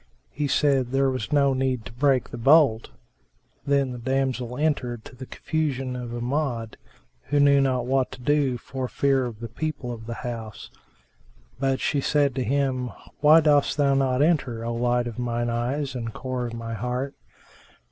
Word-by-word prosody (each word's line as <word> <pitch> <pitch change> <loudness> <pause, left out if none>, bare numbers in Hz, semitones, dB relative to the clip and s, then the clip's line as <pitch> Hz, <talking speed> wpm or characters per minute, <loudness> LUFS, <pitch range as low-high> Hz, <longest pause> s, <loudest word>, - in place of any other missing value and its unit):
He 145 0 -2
said, 135 -2 +2
"There 135 +1 +1
was 120 -5 -4
no 140 -2 +3
need 130 -3 -1
to - - -9
break 130 +1 +1
the - - -6
bolt." 135 -3 +4 0.8
Then 140 -2 +2
the 125 - -6
damsel 130 -1 -1
entered, 125 -7 -1
to - - -12
the 130 +1 -9
confusion 135 -5 -2
of 125 -1 -5
Amjad, 120 -1 -2 0.5
who 145 - +1
knew 140 -1 +5
not 130 -3 +1
what 130 0 +1
to - - -10
do 140 -1 +1
for 130 +1 -5
fear 135 0 +1
of 115 -2 -9
the 115 - -4
people 130 +1 -4
of 115 -1 -8
the 115 - -4
house; 115 -3 -6 0.9
but 135 -1 +1
she 140 - 0
said 145 -1 +2
to 130 0 -1
him, 130 -1 0 0.3
"Why 155 +2 +7
dost 145 -2 +3
thou 140 -2 +3
not 135 0 +2
enter, 130 -8 0
O 120 - -2
light 120 +1 +1
of 120 -1 -6
mine 120 -1 -1
eyes 130 +4 -2
and 115 -3 -4
core 130 +1 -4
of 115 - -7
my 115 0 -5
heart?" 125 +5 -3
130 Hz, 180 wpm, -25 LUFS, 120-140 Hz, 0.9 s, Why